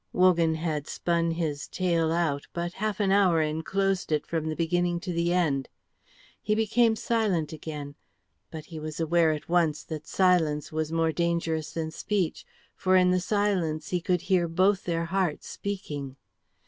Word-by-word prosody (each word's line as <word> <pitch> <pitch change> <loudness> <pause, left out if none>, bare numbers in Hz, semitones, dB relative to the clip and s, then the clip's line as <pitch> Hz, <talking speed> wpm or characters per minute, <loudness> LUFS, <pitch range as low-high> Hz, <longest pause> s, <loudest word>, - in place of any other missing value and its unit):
Wogan 170 -3 +4
had 155 -2 -2
spun 170 -1 0
his 160 -3 -2
tale 170 -3 0
out, 160 -4 0
but 175 0 -3
half 215 +1 -2
an 200 -2 +2
hour 190 -4 +4
enclosed 180 +5 -1
it, 150 -1 +1
from 160 -2 -2
the 155 - -2
beginning 175 +1 0
to 180 - -4
the 170 +1 +1
end. 150 -7 +1 0.7
He 210 - +1
became 225 +1 +3
silent 205 -10 0
again; 150 -2 -6 0.6
but 155 -2 -8
he 160 -1 -8
was 155 0 -6
aware 165 0 +3
at 150 -1 -4
once 165 -3 +1
that 155 -2 -7
silence 165 -6 +2
was 155 0 -2
more 165 0 +1
dangerous 165 -2 -1
than 160 -1 -3
speech, 190 0 -2 0.3
for 185 0 +2
in 180 -1 +5
the 185 - +3
silence 185 -6 0
he 180 -1 -1
could 180 0 0
hear 180 -3 +2
both 190 +4 +2
their 170 -1 -1
hearts 180 -3 -1
speaking. 145 -9 -5
170 Hz, 165 wpm, -27 LUFS, 155-185 Hz, 0.7 s, in